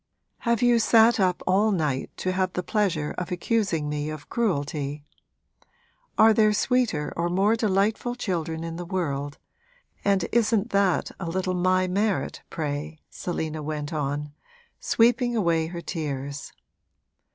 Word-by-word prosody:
Have 235 Hz, -1 st, +1 dB
you 240 Hz, -1 st, +5 dB
sat 230 Hz, 0 st, +5 dB
up 185 Hz, -2 st, +1 dB
all 200 Hz, +4 st, +3 dB
night 150 Hz, -8 st, -1 dB
to 185 Hz, -, -1 dB
have 185 Hz, 0 st, 0 dB
the 180 Hz, -, -2 dB
pleasure 180 Hz, -8 st, 0 dB
of 180 Hz, -, -5 dB
accusing 180 Hz, -4 st, 0 dB
me 150 Hz, 0 st, -2 dB
of 155 Hz, -1 st, -8 dB
cruelty? 145 Hz, -9 st, -1 dB, 1.1 s
Are 220 Hz, 0 st, +7 dB
there 215 Hz, -1 st, +4 dB
sweeter 240 Hz, -, +1 dB
or 170 Hz, +1 st, 0 dB
more 195 Hz, +5 st, +3 dB
delightful 215 Hz, +3 st, 0 dB
children 165 Hz, -8 st, -3 dB
in 165 Hz, 0 st, -5 dB
the 175 Hz, -, -4 dB
world, 145 Hz, -6 st, -3 dB, 0.7 s
and 200 Hz, -3 st, +2 dB
isn't 225 Hz, -1 st, +2 dB
that 195 Hz, -3 st, +2 dB
a 170 Hz, -3 st, -4 dB
little 185 Hz, +1 st, -1 dB
my 185 Hz, +1 st, +2 dB
merit, 195 Hz, -5 st, -1 dB
pray?' 150 Hz, 0 st, -4 dB
Selina 160 Hz, -3 st, -4 dB
went 150 Hz, 0 st, -4 dB
on, 145 Hz, 0 st, -3 dB, 0.5 s
sweeping 240 Hz, +1 st, +2 dB
away 170 Hz, -6 st, +1 dB
her 170 Hz, 0 st, -6 dB
tears. 145 Hz, -4 st, -5 dB
180 Hz, 140 wpm, -25 LUFS, 155-210 Hz, 1.1 s, Are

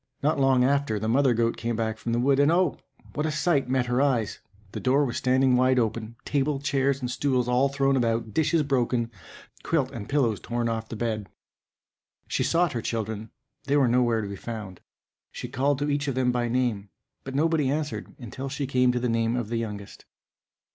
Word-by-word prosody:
Not 150 Hz, 0 st, +2 dB
long 135 Hz, -2 st, +4 dB
after, 140 Hz, -4 st, +1 dB
the 110 Hz, +2 st, -3 dB
mother 130 Hz, +1 st, +3 dB
goat 115 Hz, 0 st, +1 dB
came 115 Hz, 0 st, -2 dB
back 110 Hz, -1 st, -2 dB
from 115 Hz, -, -3 dB
the 115 Hz, -, +1 dB
wood; 135 Hz, +3 st, +3 dB
and, 145 Hz, +2 st, +5 dB
oh! 175 Hz, -2 st, +2 dB, 0.3 s
what 150 Hz, +1 st, -1 dB
a -, -, -1 dB
sight 150 Hz, -3 st, +1 dB
met 130 Hz, -1 st, +1 dB
her 125 Hz, +2 st, +1 dB
eyes! 125 Hz, -7 st, 0 dB, 0.3 s
the -, -, -5 dB
door 135 Hz, +3 st, +2 dB
was 120 Hz, -, -3 dB
standing 130 Hz, 0 st, +3 dB
wide 130 Hz, +1 st, +3 dB
open, 115 Hz, -1 st, -1 dB
table, 145 Hz, 0 st, 0 dB
chairs, 140 Hz, -1 st, 0 dB
and 125 Hz, -1 st, -3 dB
stools, 130 Hz, -2 st, 0 dB
all 125 Hz, +3 st, +3 dB
thrown 135 Hz, 0 st, +1 dB
about, 115 Hz, -3 st, 0 dB
dishes 160 Hz, 0 st, +2 dB
broken, 125 Hz, -4 st, 0 dB, 0.5 s
quilt 145 Hz, -6 st, 0 dB
and 115 Hz, -6 st, -7 dB
pillows 120 Hz, -8 st, +1 dB
torn 120 Hz, 0 st, -2 dB
off 115 Hz, -1 st, -3 dB
the -, -, -5 dB
bed. 110 Hz, -3 st, -3 dB, 1.0 s
She -, -, -1 dB
sought 170 Hz, -2 st, +2 dB
her 120 Hz, -, -2 dB
children, 110 Hz, -1 st, -3 dB, 0.4 s
they 140 Hz, +1 st, +2 dB
were 135 Hz, -3 st, +4 dB
nowhere 120 Hz, -2 st, +2 dB
to -, -, -4 dB
be 100 Hz, -, -6 dB
found. 105 Hz, -4 st, -7 dB, 0.5 s
She -, -, -6 dB
called 140 Hz, +2 st, 0 dB
to 145 Hz, +2 st, -1 dB
each 145 Hz, +1 st, -1 dB
of 135 Hz, -, -1 dB
them 130 Hz, -1 st, +2 dB
by 120 Hz, -1 st, 0 dB
name, 115 Hz, -5 st, -1 dB, 0.3 s
but 135 Hz, 0 st, -7 dB
nobody 155 Hz, -2 st, +2 dB
answered, 150 Hz, +1 st, -3 dB
until 130 Hz, +3 st, -6 dB
she 140 Hz, +1 st, -3 dB
came 125 Hz, -1 st, +3 dB
to 125 Hz, -, 0 dB
the 125 Hz, -, -1 dB
name 115 Hz, 0 st, +1 dB
of 120 Hz, -4 st, -3 dB
the 115 Hz, -, -1 dB
youngest. 105 Hz, -3 st, -6 dB
125 Hz, 205 wpm, -26 LUFS, 115-140 Hz, 1.0 s, and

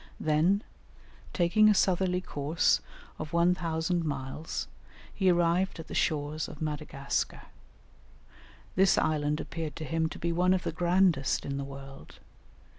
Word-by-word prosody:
Then, 165 Hz, +7 st, +2 dB, 0.7 s
taking 205 Hz, +5 st, +4 dB
a 210 Hz, -, +4 dB
southerly 185 Hz, -1 st, +2 dB
course 150 Hz, -1 st, +1 dB, 0.4 s
of 155 Hz, 0 st, -6 dB
1000 170 Hz, 0 st, +1 dB
miles, 145 Hz, +1 st, -4 dB, 0.5 s
he 190 Hz, -2 st, +2 dB
arrived 175 Hz, +1 st, +2 dB
at 165 Hz, -, -9 dB
the -, -, -6 dB
shores 150 Hz, 0 st, 0 dB
of 150 Hz, -, -10 dB
Madagascar. 150 Hz, -3 st, -3 dB, 1.3 s
This 190 Hz, 0 st, +4 dB
island 150 Hz, -1 st, +1 dB
appeared 160 Hz, -3 st, -5 dB
to 155 Hz, -, -6 dB
him 160 Hz, +1 st, 0 dB
to -, -, -8 dB
be 170 Hz, -, -1 dB
one 180 Hz, +2 st, +3 dB
of 185 Hz, -, -2 dB
the -, -, -2 dB
grandest 175 Hz, -5 st, +2 dB
in 140 Hz, 0 st, -3 dB
the 140 Hz, -, -3 dB
world. 135 Hz, 0 st, -10 dB
165 Hz, 135 wpm, -29 LUFS, 150-180 Hz, 1.3 s, taking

